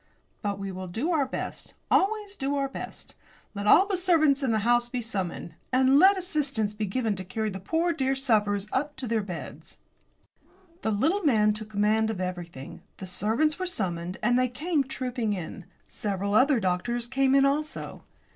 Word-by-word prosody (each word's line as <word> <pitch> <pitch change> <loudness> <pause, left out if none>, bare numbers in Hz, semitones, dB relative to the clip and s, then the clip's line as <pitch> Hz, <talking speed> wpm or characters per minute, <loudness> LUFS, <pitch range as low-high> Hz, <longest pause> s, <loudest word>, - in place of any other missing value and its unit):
But 200 -2 -2
we 195 -1 -5
will 185 0 -6
do 230 - -2
our 295 -5 +2
best; - - -5 0.2
always 410 0 +2
do 275 -4 -1
our 275 -1 0
best. 270 - -8 0.4
Let 200 0 -4
all 375 - +7
the 400 -1 -1
servants 320 -6 +3
in 265 -4 +1
the 220 - +2
house 240 0 +3
be 250 - -3
summoned, 190 -7 -4 0.2
and 260 +2 +5
let 385 +3 +7
assistance 280 - -1
be 210 0 -3
given 220 +1 -1
to 185 - -5
carry 215 +3 -3
the 190 - -6
poor 330 - 0
dear 270 -3 0
sufferers 210 -7 +1
up 290 +2 -1
to 265 - -5
their 225 -1 +1
beds." 180 -5 -8 1.0
The - - -1
little 310 - +1
man 215 - +3
took 215 0 -7
command 215 +1 +2
of 220 -4 -3
everything. 175 -7 -6 0.2
The 190 - -7
servants 220 - 0
were 370 - -1
summoned 180 - -3
and 245 +3 +3
they 255 - +3
came 300 +4 0
trooping 250 -4 -2
in. 180 -1 -6 0.2
Several 200 -1 -3
other 255 +3 +5
doctors 220 +6 -1
came 265 +2 +2
in 275 0 +5
also. 300 +3 -2
240 Hz, 185 wpm, -27 LUFS, 205-280 Hz, 1.0 s, all